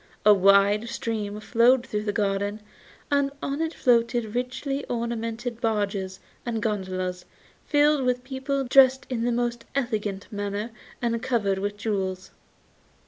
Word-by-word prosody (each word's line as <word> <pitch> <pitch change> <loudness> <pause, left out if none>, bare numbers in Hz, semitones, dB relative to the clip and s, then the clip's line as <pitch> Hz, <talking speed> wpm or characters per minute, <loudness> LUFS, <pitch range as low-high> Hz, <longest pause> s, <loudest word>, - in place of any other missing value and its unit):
A 210 - +9
wide 200 +3 +4
stream 210 -3 -3
flowed 240 +3 +3
through 210 -4 -3
the 205 - 0
garden, 205 0 -1 0.5
and 280 -1 +3
on 280 +3 -3
it 325 -1 0
floated 235 -2 +2
richly 265 +3 -2
ornamented 235 0 -3
barges 200 -4 -1 0.2
and 235 -2 -2
gondolas 185 -4 -2 0.4
filled 295 -1 +3
with 250 0 0
people 270 +1 -2
dressed 265 0 +5
in 235 -2 -1
the 245 - +1
most 240 0 -1
elegant 215 -7 -2
manner 205 +2 -3 0.3
and 230 -1 0
covered 210 -7 0
with 205 +1 -3
jewels. 190 -3 -3
230 Hz, 135 wpm, -25 LUFS, 205-250 Hz, 0.5 s, A